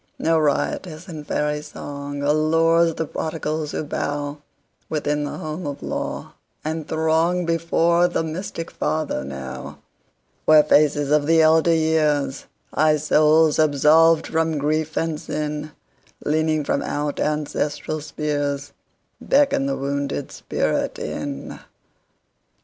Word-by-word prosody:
No 165 Hz, 0 st, +2 dB
riotous 155 Hz, +3 st, -1 dB
and 155 Hz, -4 st, -8 dB
fairy 150 Hz, 0 st, 0 dB
songAllures 155 Hz, +4 st, +1 dB
the 160 Hz, -, -2 dB
prodigals 155 Hz, -1 st, -3 dB
who -, -, -3 dB
bowWithin 145 Hz, +1 st, -4 dB
the -, -, -5 dB
home 155 Hz, +2 st, -5 dB
of 145 Hz, -1 st, -6 dB
law, -, -, -4 dB, 0.3 s
and 160 Hz, 0 st, -3 dB
throngBefore 170 Hz, +1 st, +2 dB
the 165 Hz, -, 0 dB
mystic 165 Hz, +1 st, -5 dB
Father 155 Hz, -, -2 dB
now, 65 Hz, -1 st, -7 dB, 0.7 s
Where 155 Hz, -1 st, +7 dB
faces 145 Hz, -1 st, +3 dB
of 150 Hz, -1 st, +3 dB
the 165 Hz, 0 st, +5 dB
elder 160 Hz, +1 st, +4 dB
years, 155 Hz, -4 st, +1 dB, 0.3 s
High 155 Hz, 0 st, +3 dB
souls 155 Hz, +1 st, +4 dB
absolved 155 Hz, +2 st, +5 dB
from 160 Hz, -1 st, 0 dB
grief 155 Hz, +2 st, -1 dB
and 165 Hz, -2 st, -1 dB
sin, 150 Hz, -1 st, -4 dB, 0.5 s
Leaning 155 Hz, 0 st, +1 dB
from -, -, 0 dB
out 145 Hz, 0 st, -3 dB
ancestral 150 Hz, 0 st, -2 dB
spheresBeckon 150 Hz, -, -1 dB
the 275 Hz, -, -1 dB
wounded 140 Hz, 0 st, -3 dB
spirit -, -, -2 dB
in. 140 Hz, -1 st, -5 dB
155 Hz, 110 wpm, -22 LUFS, 145-160 Hz, 0.7 s, Where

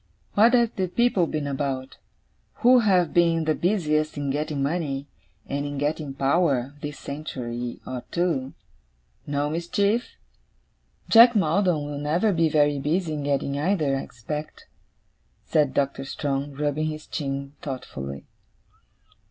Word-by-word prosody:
What 230 Hz, +4 st, +5 dB
have 235 Hz, -2 st, +2 dB
the 190 Hz, -1 st, 0 dB
people 195 Hz, -3 st, +2 dB
been 150 Hz, -2 st, -3 dB
about, 135 Hz, -2 st, -3 dB, 0.7 s
who 250 Hz, +1 st, +8 dB
have 185 Hz, -7 st, +3 dB
been 165 Hz, -2 st, +3 dB
the 155 Hz, -, +2 dB
busiest 155 Hz, -5 st, 0 dB
in 140 Hz, -1 st, -1 dB
getting 150 Hz, 0 st, -2 dB
money, 140 Hz, -3 st, -2 dB, 0.4 s
and 140 Hz, +1 st, -2 dB
in 145 Hz, 0 st, -4 dB
getting 145 Hz, -1 st, -2 dB
power, 140 Hz, -2 st, +1 dB
this 150 Hz, 0 st, -5 dB
century 125 Hz, -5 st, -5 dB
or 125 Hz, -1 st, -5 dB
two? 160 Hz, -7 st, -1 dB, 0.7 s
No 145 Hz, 0 st, 0 dB
mischief?' 200 Hz, +8 st, 0 dB, 0.9 s
'Jack 235 Hz, +1 st, +8 dB
Maldon 180 Hz, -4 st, +2 dB
will 145 Hz, -1 st, -5 dB
never 170 Hz, +8 st, +1 dB
be 165 Hz, -2 st, +2 dB
very 145 Hz, -1 st, +3 dB
busy 160 Hz, +3 st, 0 dB
in 150 Hz, -, -3 dB
getting 140 Hz, 0 st, -1 dB
either, 155 Hz, -4 st, +1 dB
I 135 Hz, -, -1 dB
expect,' 150 Hz, +6 st, -7 dB, 0.8 s
said 150 Hz, -4 st, +2 dB
Doctor 140 Hz, -1 st, 0 dB
Strong, 140 Hz, 0 st, -3 dB
rubbing 150 Hz, +2 st, -1 dB
his 155 Hz, 0 st, -5 dB
chin 140 Hz, -2 st, -4 dB
thoughtfully. 70 Hz, -, -6 dB
150 Hz, 135 wpm, -25 LUFS, 140-170 Hz, 0.9 s, who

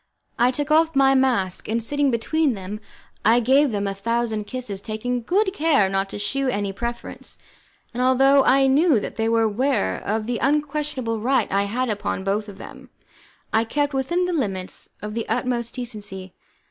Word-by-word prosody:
I 240 Hz, +1 st, +5 dB
took 290 Hz, +4 st, -2 dB
off 320 Hz, 0 st, +4 dB
my 270 Hz, 0 st, +5 dB
mask, 245 Hz, -9 st, +1 dB
and 220 Hz, -, 0 dB
sitting 285 Hz, +4 st, +1 dB
between 265 Hz, +3 st, +1 dB
them, 195 Hz, +2 st, -6 dB, 0.4 s
I 230 Hz, +3 st, +5 dB
gave 270 Hz, +5 st, +4 dB
them 205 Hz, -3 st, -2 dB
a 195 Hz, -, -1 dB
thousand 220 Hz, +1 st, -1 dB
kisses, 215 Hz, -5 st, -5 dB
taking 240 Hz, +4 st, -3 dB
good 380 Hz, -, +1 dB
care 290 Hz, -, +3 dB
not 195 Hz, 0 st, -1 dB
to -, -, -6 dB
shew 260 Hz, +7 st, -1 dB
any 205 Hz, -5 st, -1 dB
preference, 235 Hz, +3 st, -6 dB, 0.6 s
and 245 Hz, -, -2 dB
although 270 Hz, +2 st, +5 dB
I 270 Hz, +1 st, +4 dB
knew 280 Hz, 0 st, +4 dB
that -, -, -7 dB
they 225 Hz, 0 st, +1 dB
were 230 Hz, 0 st, +3 dB
aware 220 Hz, -, 0 dB
of 215 Hz, +1 st, -1 dB
the 240 Hz, 0 st, -2 dB
unquestionable 290 Hz, -4 st, -1 dB
right 260 Hz, +5 st, +1 dB
I 200 Hz, +1 st, +2 dB
had 250 Hz, +5 st, -1 dB
upon 205 Hz, -3 st, -2 dB
both 205 Hz, +2 st, -1 dB
of 195 Hz, -, -11 dB
them, 265 Hz, +3 st, -11 dB, 0.6 s
I 225 Hz, -, +4 dB
kept 290 Hz, +5 st, -1 dB
within 345 Hz, +7 st, 0 dB
the 360 Hz, -, -2 dB
limits 195 Hz, -, -3 dB
of 210 Hz, 0 st, -5 dB
the 230 Hz, 0 st, -4 dB
utmost 240 Hz, -2 st, -1 dB
decency. 205 Hz, -6 st, -6 dB
240 Hz, 180 wpm, -23 LUFS, 210-275 Hz, 0.6 s, I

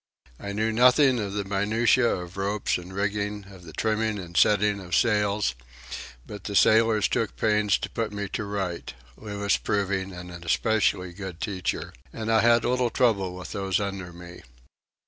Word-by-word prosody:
I 100 Hz, -, -5 dB
knew 110 Hz, +2 st, 0 dB
nothing 125 Hz, +2 st, +5 dB
of 100 Hz, -2 st, -3 dB
the 100 Hz, 0 st, -1 dB
minutiæ 105 Hz, +2 st, +2 dB
of 90 Hz, +1 st, -12 dB
ropes 100 Hz, 0 st, -1 dB
and 90 Hz, +1 st, -10 dB
rigging, 100 Hz, +1 st, -2 dB
of 95 Hz, -2 st, -13 dB
the 80 Hz, -, -10 dB
trimming 110 Hz, +2 st, 0 dB
and 85 Hz, -3 st, -9 dB
setting 105 Hz, +5 st, +3 dB
of 90 Hz, -2 st, -3 dB
sails; 105 Hz, -, +2 dB, 0.7 s
but 105 Hz, -, -9 dB
the 100 Hz, -, -4 dB
sailors 110 Hz, 0 st, +4 dB
took 115 Hz, -, -1 dB
pains 105 Hz, -2 st, +2 dB
to -, -, -4 dB
put 115 Hz, -2 st, -2 dB
me 100 Hz, -1 st, -4 dB
to 110 Hz, -, -3 dB
rights,—Louis 100 Hz, -, -3 dB
proving 100 Hz, -2 st, -1 dB
an 90 Hz, 0 st, -9 dB
especially 90 Hz, +1 st, 0 dB
good 95 Hz, -2 st, -7 dB
teacher,—and 95 Hz, -, -4 dB
I 110 Hz, -1 st, +5 dB
had 115 Hz, +1 st, +4 dB
little 125 Hz, 0 st, +1 dB
trouble 100 Hz, -8 st, +1 dB
with 90 Hz, -, -8 dB
those 95 Hz, -1 st, -1 dB
under 95 Hz, -3 st, -4 dB
me. 85 Hz, 0 st, -11 dB
100 Hz, 160 wpm, -26 LUFS, 95-110 Hz, 0.7 s, nothing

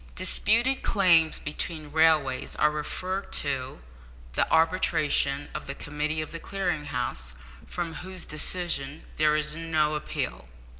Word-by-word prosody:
Disputed 230 Hz, +7 st, +2 dB
claims 170 Hz, -6 st, +4 dB
between 150 Hz, 0 st, -4 dB
railways 155 Hz, -4 st, +2 dB
are 150 Hz, 0 st, +3 dB
referred 185 Hz, +6 st, -4 dB
to 130 Hz, -, -1 dB, 0.5 s
the -, -, +1 dB
arbitration 155 Hz, -4 st, +2 dB
of -, -, -6 dB
the 140 Hz, -, -3 dB
committee 150 Hz, +2 st, -2 dB
of 155 Hz, -, -10 dB
the 165 Hz, -, -5 dB
Clearing 180 Hz, -5 st, -2 dB
House, 65 Hz, -, -3 dB, 0.3 s
from 170 Hz, -2 st, -4 dB
whose 185 Hz, +2 st, -7 dB
decision 155 Hz, -2 st, 0 dB
there 150 Hz, 0 st, +4 dB
is 150 Hz, 0 st, 0 dB
no 160 Hz, -2 st, +1 dB
appeal. 60 Hz, -, -4 dB
155 Hz, 130 wpm, -27 LUFS, 145-175 Hz, 0.5 s, claims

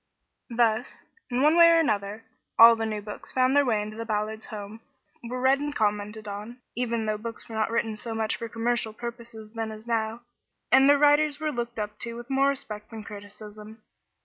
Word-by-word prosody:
Thus, 230 Hz, 0 st, 0 dB, 0.3 s
in 250 Hz, +2 st, 0 dB
one 305 Hz, +2 st, +5 dB
way 340 Hz, 0 st, +8 dB
or 335 Hz, -, +6 dB
another, 210 Hz, -6 st, -1 dB, 0.3 s
all 230 Hz, 0 st, +10 dB
the 225 Hz, 0 st, -2 dB
new 210 Hz, -1 st, -4 dB
books 210 Hz, 0 st, -7 dB
found 255 Hz, +1 st, +2 dB
their 285 Hz, -, +6 dB
way 220 Hz, -5 st, +1 dB
into 215 Hz, +1 st, -8 dB
the 230 Hz, -, -3 dB
Ballards' 215 Hz, 0 st, -3 dB
home, 210 Hz, +1 st, -8 dB, 0.4 s
were 250 Hz, +2 st, -4 dB
read 265 Hz, +2 st, +3 dB
and 290 Hz, 0 st, -4 dB
commented 210 Hz, 0 st, -1 dB
on, 210 Hz, +4 st, -7 dB, 0.2 s
even 235 Hz, -2 st, -1 dB
though 215 Hz, -1 st, -1 dB
books 230 Hz, 0 st, -7 dB
were 230 Hz, -, -10 dB
not 220 Hz, 0 st, 0 dB
written 225 Hz, -1 st, -1 dB
so 225 Hz, +1 st, -5 dB
much 220 Hz, -1 st, -1 dB
for 230 Hz, -, -6 dB
commercial 230 Hz, -1 st, -1 dB
purposes 235 Hz, -2 st, -8 dB
then 225 Hz, -1 st, -3 dB
as 215 Hz, +1 st, -10 dB
now, 225 Hz, 0 st, -1 dB, 0.5 s
and 265 Hz, +2 st, +7 dB
their 285 Hz, -, +7 dB
writers 295 Hz, 0 st, +4 dB
were 310 Hz, -1 st, -1 dB
looked 240 Hz, -3 st, -4 dB
up 210 Hz, -1 st, -4 dB
to 235 Hz, 0 st, -4 dB
with 240 Hz, +3 st, -9 dB
more 270 Hz, +1 st, +3 dB
respect 215 Hz, -6 st, -3 dB
than 225 Hz, -2 st, -8 dB
criticism. 210 Hz, +1 st, -11 dB
225 Hz, 200 wpm, -26 LUFS, 215-245 Hz, 0.5 s, all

